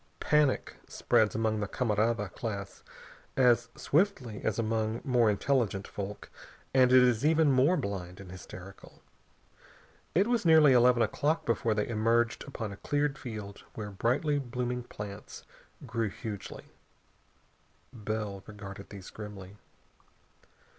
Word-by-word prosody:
Panic 150 Hz, -3 st, +1 dB
spreads 110 Hz, -1 st, +2 dB
among 110 Hz, -1 st, 0 dB
the 105 Hz, -, -2 dB
camarada 110 Hz, -1 st, 0 dB
class 100 Hz, -4 st, -5 dB, 0.6 s
as 120 Hz, -3 st, +4 dB
swiftly 145 Hz, -, 0 dB
as 110 Hz, -, 0 dB
among 110 Hz, 0 st, -1 dB
more 125 Hz, -5 st, +3 dB
intelligent 105 Hz, -2 st, 0 dB
folk, 100 Hz, 0 st, -7 dB, 0.4 s
and 130 Hz, -1 st, +5 dB
it 130 Hz, 0 st, +8 dB
is 120 Hz, -2 st, +2 dB
even 155 Hz, -1 st, +4 dB
more 135 Hz, +8 st, +4 dB
blind 95 Hz, -, -4 dB
and 95 Hz, -2 st, -10 dB
hysterical. 95 Hz, +1 st, -12 dB, 1.1 s
It 190 Hz, +4 st, +4 dB
was 240 Hz, -1 st, +1 dB
nearly 160 Hz, -5 st, +7 dB
eleven 125 Hz, -1 st, +5 dB
o'clock 160 Hz, +2 st, 0 dB
before 115 Hz, -1 st, +1 dB
they 105 Hz, -, 0 dB
emerged 115 Hz, +1 st, +1 dB
upon 110 Hz, -6 st, -5 dB
a 100 Hz, -, -8 dB
cleared 145 Hz, +3 st, -1 dB
field 105 Hz, -5 st, -7 dB
where 105 Hz, -2 st, -5 dB
brightly 130 Hz, +9 st, +1 dB
blooming 125 Hz, -1 st, -3 dB
plants 105 Hz, -2 st, -8 dB, 0.4 s
grew 115 Hz, -2 st, -1 dB
hugely. 105 Hz, 0 st, -7 dB, 1.3 s
Bell 105 Hz, -3 st, -4 dB
regarded 100 Hz, -2 st, -9 dB
these 100 Hz, -3 st, -10 dB
grimly. 105 Hz, -2 st, -9 dB
115 Hz, 125 wpm, -30 LUFS, 105-130 Hz, 1.3 s, it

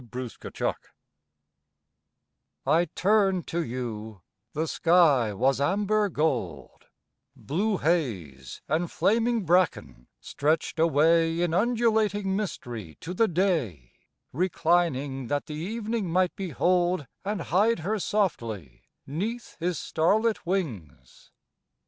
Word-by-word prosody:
FOUND 125 Hz, -2 st, -5 dB
WANTING -, -, -2 dB, 1.9 s
I 160 Hz, +5 st, +3 dB
turn'd 195 Hz, -2 st, +2 dB
to 170 Hz, 0 st, -2 dB
you, 110 Hz, -, -6 dB, 0.3 s
the 160 Hz, +2 st, -1 dB
sky 160 Hz, -10 st, +4 dB
was 130 Hz, +7 st, +1 dB
amber 205 Hz, +6 st, +1 dB
gold, 120 Hz, -, -2 dB, 0.5 s
Blue 200 Hz, +8 st, -1 dB
haze 95 Hz, -, -2 dB
and 165 Hz, +3 st, 0 dB
flaming 230 Hz, 0 st, +1 dB
bracken 170 Hz, -, +1 dB
stretched 155 Hz, +2 st, -1 dB
away 165 Hz, +1 st, +3 dB
In 170 Hz, -2 st, 0 dB
undulating 215 Hz, -2 st, +1 dB
mystery 120 Hz, -, -5 dB
to 175 Hz, -, -5 dB
the 225 Hz, +4 st, +3 dB
day, 155 Hz, -, -1 dB, 0.4 s
Reclining 155 Hz, -5 st, 0 dB
that 145 Hz, +2 st, -1 dB
the 155 Hz, -, -7 dB
evening 215 Hz, +5 st, -3 dB
might 180 Hz, +1 st, +1 dB
behold 180 Hz, -1 st, +1 dB, 0.2 s
And 205 Hz, 0 st, -2 dB
hide 200 Hz, +5 st, +1 dB
her 210 Hz, +6 st, -1 dB
softly 115 Hz, -, -2 dB, 0.2 s
'neath 215 Hz, -, -4 dB
his 175 Hz, 0 st, -1 dB
starlit 210 Hz, +5 st, +1 dB
wings. 125 Hz, -, -4 dB
170 Hz, 105 wpm, -27 LUFS, 135-195 Hz, 1.9 s, sky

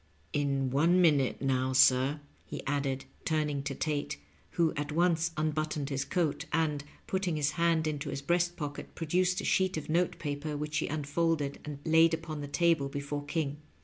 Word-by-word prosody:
^^ -, -, -37 dB, 0.3 s
In 140 Hz, -2 st, 0 dB
one 165 Hz, +7 st, +4 dB
minute 145 Hz, -7 st, +3 dB
now, 130 Hz, -1 st, +1 dB
sir," 130 Hz, +3 st, +4 dB, 0.2 s
he -, -, -7 dB
added, 135 Hz, -2 st, -1 dB, 0.2 s
turning 150 Hz, -3 st, 0 dB
to 135 Hz, 0 st, -4 dB
Tate, 145 Hz, -, -2 dB, 0.4 s
who 170 Hz, -2 st, +3 dB
at 145 Hz, 0 st, -3 dB
once 170 Hz, 0 st, +2 dB
unbuttoned 155 Hz, -2 st, -1 dB
his 140 Hz, 0 st, -1 dB
coat, 165 Hz, -1 st, 0 dB
and, 150 Hz, -3 st, +1 dB, 0.2 s
putting 190 Hz, -3 st, -1 dB
his 145 Hz, -1 st, +1 dB
hand 165 Hz, -1 st, +2 dB
into 150 Hz, -1 st, -2 dB
his 140 Hz, 0 st, -4 dB
breast 175 Hz, +2 st, +1 dB
pocket, 145 Hz, -3 st, -6 dB
produced 180 Hz, +3 st, +1 dB
a -, -, -5 dB
sheet 190 Hz, -2 st, +2 dB
of 155 Hz, -, -6 dB
note 170 Hz, +3 st, +1 dB
paper, 145 Hz, 0 st, -3 dB
which 150 Hz, +1 st, -3 dB
he -, -, -1 dB
unfolded 150 Hz, 0 st, -1 dB
and 150 Hz, -2 st, -6 dB
laid 160 Hz, 0 st, +5 dB
upon 160 Hz, -2 st, -6 dB
the 145 Hz, -, -5 dB
table 160 Hz, -2 st, +2 dB
before 140 Hz, +1 st, -4 dB
King. 145 Hz, -2 st, -2 dB
150 Hz, 180 wpm, -30 LUFS, 140-165 Hz, 0.4 s, laid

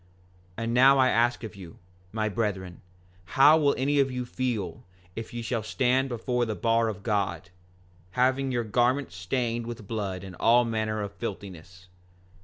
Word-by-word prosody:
5:22 -, -, -3 dB
And 115 Hz, +1 st, -2 dB
now 135 Hz, +3 st, +6 dB
I 130 Hz, -1 st, +4 dB
ask 120 Hz, +1 st, +1 dB
of 110 Hz, -1 st, -7 dB
you, 90 Hz, -4 st, -11 dB, 0.3 s
my 110 Hz, 0 st, -1 dB
brethren, 95 Hz, -5 st, -3 dB, 0.6 s
how 150 Hz, +4 st, +7 dB
will 145 Hz, -2 st, +3 dB
any 140 Hz, +2 st, +1 dB
of 135 Hz, -1 st, +3 dB
you 125 Hz, -1 st, -4 dB
feel, 120 Hz, -9 st, -3 dB, 0.3 s
if 115 Hz, -, -6 dB
ye 120 Hz, 0 st, -5 dB
shall 115 Hz, 0 st, -2 dB
stand 130 Hz, +4 st, +1 dB
before 125 Hz, +1 st, -1 dB
the 110 Hz, -2 st, -2 dB
bar 115 Hz, +1 st, +2 dB
of 105 Hz, -2 st, -5 dB
God, 95 Hz, -5 st, -2 dB, 0.7 s
having 130 Hz, +1 st, +2 dB
your 120 Hz, -2 st, 0 dB
garments 120 Hz, +1 st, 0 dB
stained 115 Hz, +5 st, -2 dB
with 115 Hz, -3 st, -7 dB
blood 100 Hz, -4 st, -4 dB
and 95 Hz, -2 st, -9 dB
all 120 Hz, +2 st, +5 dB
manner 110 Hz, -2 st, -2 dB
of 100 Hz, -, -5 dB
filthiness? 95 Hz, -5 st, -8 dB
115 Hz, 170 wpm, -27 LUFS, 100-125 Hz, 0.7 s, how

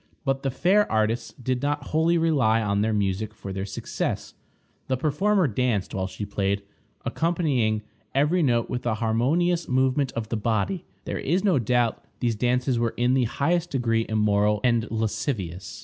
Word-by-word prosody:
But 135 Hz, -1 st, 0 dB
the 135 Hz, -, 0 dB
fair 190 Hz, +10 st, +2 dB
artists 110 Hz, +2 st, 0 dB
did 125 Hz, 0 st, -2 dB
not 145 Hz, +1 st, -2 dB
wholly 160 Hz, +2 st, +3 dB
rely 140 Hz, -10 st, +3 dB
on 100 Hz, -2 st, 0 dB
their 110 Hz, +1 st, +1 dB
music 105 Hz, +1 st, -1 dB
for 95 Hz, -3 st, -7 dB
their 95 Hz, +1 st, -3 dB
success. 95 Hz, -, -3 dB, 0.5 s
The 130 Hz, -, 0 dB
performer 180 Hz, +8 st, +2 dB
danced 115 Hz, -4 st, -1 dB
while 95 Hz, -1 st, -1 dB
she 105 Hz, +2 st, -6 dB
played, 100 Hz, 0 st, -1 dB, 0.4 s
accompanying 135 Hz, -11 st, 0 dB, 0.3 s
every 150 Hz, +6 st, +3 dB
note 120 Hz, -6 st, +2 dB
with 125 Hz, 0 st, -3 dB
a 110 Hz, -, +1 dB
harmonious 145 Hz, +11 st, +1 dB
movement 130 Hz, +1 st, +1 dB
of 110 Hz, -1 st, -4 dB
the 115 Hz, -, -1 dB
body. 110 Hz, -, -1 dB, 0.2 s
There -, -, -3 dB
is 175 Hz, +7 st, 0 dB
no 185 Hz, -9 st, +3 dB
doubt 120 Hz, 0 st, +1 dB, 0.2 s
these 120 Hz, -2 st, 0 dB
dances 125 Hz, +2 st, +1 dB
were 115 Hz, -1 st, 0 dB
in 120 Hz, +1 st, +2 dB
the 130 Hz, -2 st, +3 dB
highest 165 Hz, +8 st, 0 dB
degree 115 Hz, -5 st, 0 dB
immoral 105 Hz, -1 st, +2 dB
and 120 Hz, -2 st, +2 dB
lascivious. 105 Hz, -, -3 dB
120 Hz, 165 wpm, -25 LUFS, 110-145 Hz, 0.5 s, wholly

